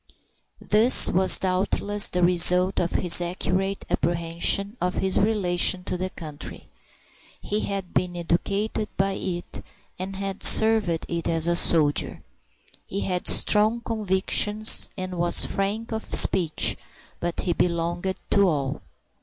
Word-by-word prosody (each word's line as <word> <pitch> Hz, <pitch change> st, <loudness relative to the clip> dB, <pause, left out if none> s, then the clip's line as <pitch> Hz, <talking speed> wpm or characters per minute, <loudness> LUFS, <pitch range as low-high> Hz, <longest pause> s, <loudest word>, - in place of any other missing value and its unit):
This 220 Hz, +4 st, +5 dB
was 185 Hz, +1 st, +4 dB
doubtless 200 Hz, +2 st, 0 dB
the 180 Hz, 0 st, -1 dB
result 180 Hz, +2 st, +3 dB
of 170 Hz, -, -2 dB
his 180 Hz, -1 st, +3 dB
accurate 185 Hz, +2 st, -3 dB
apprehension 170 Hz, +5 st, 0 dB
of 180 Hz, +1 st, -2 dB
his 190 Hz, 0 st, 0 dB
relation 185 Hz, -3 st, +2 dB
to 180 Hz, -, -4 dB
the 185 Hz, +1 st, -4 dB
country. 155 Hz, -5 st, -9 dB, 0.7 s
He 210 Hz, -, -3 dB
had 195 Hz, -3 st, -5 dB
been 175 Hz, -1 st, -2 dB
educated 200 Hz, +5 st, -2 dB
by 195 Hz, +1 st, 0 dB
it, 175 Hz, -2 st, -6 dB, 0.4 s
and 190 Hz, +1 st, -6 dB
had 195 Hz, 0 st, -6 dB
served 220 Hz, -3 st, +4 dB, 0.2 s
it 170 Hz, -1 st, -4 dB
as 165 Hz, -1 st, -1 dB
a 170 Hz, -, +1 dB
soldier. 155 Hz, -4 st, +1 dB, 0.6 s
He 200 Hz, -, -4 dB
had 180 Hz, -1 st, -3 dB
strong 215 Hz, +3 st, +3 dB
convictions 210 Hz, 0 st, +2 dB
and 185 Hz, -1 st, -6 dB
was 175 Hz, 0 st, +2 dB
frank 210 Hz, +4 st, -3 dB
of 220 Hz, 0 st, -4 dB
speech, 165 Hz, -4 st, +1 dB, 0.4 s
but 175 Hz, 0 st, -4 dB
he 175 Hz, -, -1 dB
belonged 175 Hz, +2 st, -2 dB, 0.2 s
to 200 Hz, -, +3 dB
all. 140 Hz, -4 st, -3 dB
185 Hz, 130 wpm, -23 LUFS, 175-200 Hz, 0.7 s, This